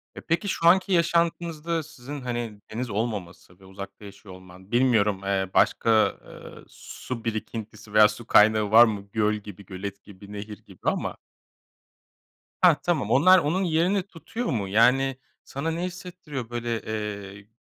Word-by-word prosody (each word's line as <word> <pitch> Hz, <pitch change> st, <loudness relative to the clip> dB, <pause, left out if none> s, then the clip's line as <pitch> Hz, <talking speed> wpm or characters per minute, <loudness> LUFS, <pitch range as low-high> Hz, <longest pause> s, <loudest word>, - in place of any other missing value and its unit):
E, -, -, -8 dB
peki, 170 Hz, +5 st, -1 dB
şu 170 Hz, -, +1 dB
anki 190 Hz, +2 st, +4 dB
yaşantınızda 170 Hz, -1 st, 0 dB
sizin, 145 Hz, -1 st, -9 dB
hani, 120 Hz, -4 st, -4 dB
deniz 120 Hz, +2 st, -4 dB
olmaması 100 Hz, -4 st, -5 dB
ve 95 Hz, -, -17 dB
uzakta 100 Hz, +2 st, -10 dB
yaşıyor 100 Hz, -1 st, -12 dB
olman, 95 Hz, +2 st, -16 dB
bilmiyorum, 110 Hz, -6 st, +2 dB
eee, 95 Hz, -1 st, -1 dB
başka, 115 Hz, -, +2 dB, 0.4 s
ııı, -, -, -12 dB
su 115 Hz, -3 st, -8 dB
birikintisi 110 Hz, -1 st, -6 dB
veya 105 Hz, 0 st, +8 dB
su 110 Hz, +2 st, -8 dB
kaynağı 105 Hz, 0 st, +4 dB
var 115 Hz, +2 st, +9 dB
mı? 100 Hz, -3 st, -4 dB
Göl 105 Hz, -1 st, +2 dB
gibi, 105 Hz, -2 st, -9 dB
gölet 100 Hz, +1 st, -7 dB
gibi, 100 Hz, 0 st, -14 dB
nehir 105 Hz, 0 st, -7 dB
gibi 95 Hz, -3 st, -17 dB
ama. -, -, -1 dB, 1.4 s
Hah, 180 Hz, -4 st, +7 dB
tamam. 155 Hz, -, 0 dB
Onlar 185 Hz, +9 st, +6 dB
onun 175 Hz, +5 st, 0 dB
yerini 175 Hz, +4 st, +1 dB
tutuyor 200 Hz, +6 st, -7 dB
mu? 105 Hz, -, -1 dB
Yani, 125 Hz, +6 st, +3 dB, 0.3 s
sana 150 Hz, +4 st, -4 dB
ne 170 Hz, +2 st, -3 dB
hissettiriyor, 175 Hz, -9 st, -7 dB
böyle, 120 Hz, -1 st, -3 dB
eee, 100 Hz, -2 st, -6 dB
115 Hz, 150 wpm, -25 LUFS, 100-155 Hz, 1.4 s, var